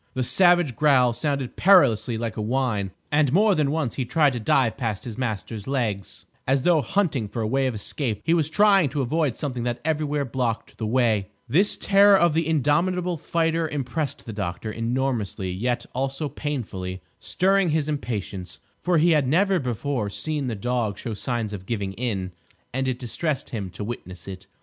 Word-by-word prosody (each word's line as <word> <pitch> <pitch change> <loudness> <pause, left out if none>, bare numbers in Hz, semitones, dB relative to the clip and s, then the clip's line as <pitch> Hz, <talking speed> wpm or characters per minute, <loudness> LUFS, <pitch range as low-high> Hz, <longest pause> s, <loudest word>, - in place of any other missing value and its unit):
The 130 - 0
savage 175 -2 +4
growl 130 -3 +4
sounded 140 -1 -2
perilously 120 - +4
like 115 -1 -3
a 110 - -3
whine, 110 -4 0 0.2
and 145 -2 +3
more 205 +6 +4
than 150 -5 +1
once 150 -5 -1
he 130 - -2
tried 145 +2 +2
to 120 - -3
dive 115 +1 +2
past 115 -6 -3
his 115 -3 -6
master's 110 -3 -4
legs, 115 -8 -3 0.2
as 135 0 +2
though 170 -3 +4
hunting 145 - 0
for 115 +2 -4
a - - -1
way 135 +3 +1
of 125 - -2
escape. 110 +1 -3
He 165 - +2
was 160 -3 +2
trying 195 -3 +4
to 140 +1 -1
avoid 150 0 0
something 130 -5 -4
that 120 -1 -2
everywhere 150 -2 0
blocked 120 -2 -3
the 110 - -2
way. 110 -4 +2 0.2
This 190 +8 +2
terror 200 0 +6
of 170 -3 +3
the 160 0 +1
indomitable 170 +4 +1
fighter 165 0 0
impressed 140 0 -3
the 115 - -6
doctor 100 +1 -4
enormously; 115 -5 -2
yet 120 +6 -1
also 135 +4 -2
painfully; 100 -11 -5 0.2
stirring 195 -1 +2
his 155 -1 0
impatience; 105 - -4 0.2
for 175 -1 +2
he 170 +2 +4
had 150 -4 +3
never 190 +6 +3
before 125 -3 -2
seen 150 +5 -3
the 115 - -2
dog 115 -1 -1
show 115 - -5
signs 110 0 -3
of 95 -2 -8
giving 100 -4 -2
in, 100 -5 -3 0.4
and 130 +1 -1
it 130 -1 -1
distressed 135 +4 -3
him 100 -5 -4
to 90 - -7
witness 95 -6 -7
it. 95 0 -8
130 Hz, 185 wpm, -24 LUFS, 110-155 Hz, 0.4 s, terror